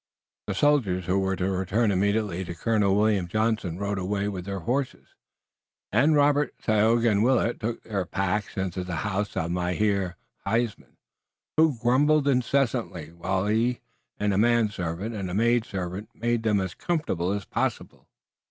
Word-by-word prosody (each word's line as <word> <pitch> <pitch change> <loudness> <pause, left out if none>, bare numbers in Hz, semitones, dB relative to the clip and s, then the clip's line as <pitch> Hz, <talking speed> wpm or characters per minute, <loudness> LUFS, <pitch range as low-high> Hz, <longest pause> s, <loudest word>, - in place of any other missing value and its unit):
The - - -2
soldiers, 110 - +2
who 95 +2 +1
were 95 0 0
to 95 +1 -1
return 95 +4 +1
immediately 100 -1 0
to 85 0 -6
Colonel 105 +1 +2
William 105 -3 +2
Johnson, 110 -3 -1
rode 100 0 -2
away 100 +2 -1
with 95 -3 -4
their 100 -1 -4
horses, 130 +6 -2 0.8
and 140 +9 +4
Robert, 145 0 +3
Tayoga 115 +2 +3
and 105 +1 +2
Willet 120 -1 +2
took 115 +1 -4
their 100 -4 -2
packs 95 +4 -2
into 95 -1 -2
the 90 -2 -4
house 105 0 -2
of 80 +1 -1
Mynheer 90 +1 0 0.3
Huysman, 115 +2 -2 0.6
who 155 -4 +3
grumbled 145 +5 +3
incessantly 125 - 0
while 95 +3 -2
he 115 +4 +1 0.4
and 105 -1 +1
a 95 - +2
manservant 105 -4 0
and 100 -4 -4
a 90 - -4
maidservant 105 -4 0
made 120 0 0
them 110 -3 +2
as 95 -2 -3
comfortable 120 - -1
as 100 -1 -3
possible. - - -3
105 Hz, 150 wpm, -26 LUFS, 95-120 Hz, 0.8 s, and